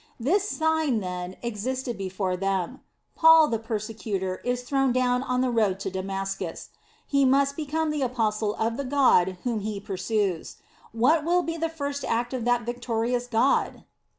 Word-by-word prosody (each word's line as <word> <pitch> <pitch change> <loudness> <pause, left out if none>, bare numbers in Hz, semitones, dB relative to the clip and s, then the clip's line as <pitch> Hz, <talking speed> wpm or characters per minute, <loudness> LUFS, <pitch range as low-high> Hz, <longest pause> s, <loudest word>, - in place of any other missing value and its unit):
This 380 - +1
sign, 315 - +1
then, 180 -1 -5
existed 240 +2 -3
before 190 -1 -2
them. 195 +5 -2 0.3
Paul 320 -1 +7
the 225 - -1
persecutor, 215 -4 -3
is 245 0 -1
thrown 270 0 +1
down 250 0 +2
on 250 -1 0
the 255 -1 +1
road 210 -5 +1
to 195 - -3
Damascus. 195 +1 -4 0.4
He 280 -1 +2
must 275 +1 +3
become 315 +1 -1
the 300 -1 -2
apostle 220 -4 0
of 225 +1 -1
the 280 - -2
God 250 -10 +3
whom 235 -3 -1
he 210 0 -4
pursues. 195 -2 -2 0.4
What 270 +8 +3
will 350 +2 +2
be 330 -1 -3
the 330 0 -1
first 285 -3 -4
act 240 +2 -1
of 245 -3 -3
that 245 0 +2
victorious 240 +1 -2
God? 245 +3 +1
240 Hz, 160 wpm, -26 LUFS, 205-275 Hz, 0.4 s, Paul